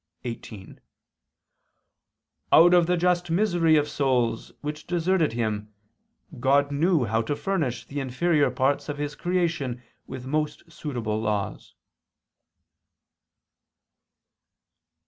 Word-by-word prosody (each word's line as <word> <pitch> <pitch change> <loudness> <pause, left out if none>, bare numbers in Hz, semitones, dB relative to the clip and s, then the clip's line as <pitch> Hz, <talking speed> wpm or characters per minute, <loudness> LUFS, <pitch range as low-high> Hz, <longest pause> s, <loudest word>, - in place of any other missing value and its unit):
xviii): 110 -4 -8 1.7
Out 175 +2 +7
of 175 -2 +5
the 180 0 +2
just 175 0 +1
misery 170 -3 +3
of 150 -1 +3
the - - -9
souls 125 -5 0
which 150 +1 -6
deserted 175 -4 +1
Him, 110 -2 -2 0.7
God 140 +2 +3
knew 155 -1 +2
how 110 +1 +1
to 130 +6 -2
furnish 160 -9 -2
the 145 - -5
inferior 145 +4 +1
parts 140 +2 0
of 145 - -3
His 145 0 -3
creation 170 -9 -1 0.2
with 130 -1 -7
most 150 +3 -3
suitable 120 -9 -3
laws." 105 -2 -3
145 Hz, 105 wpm, -25 LUFS, 125-170 Hz, 1.7 s, Out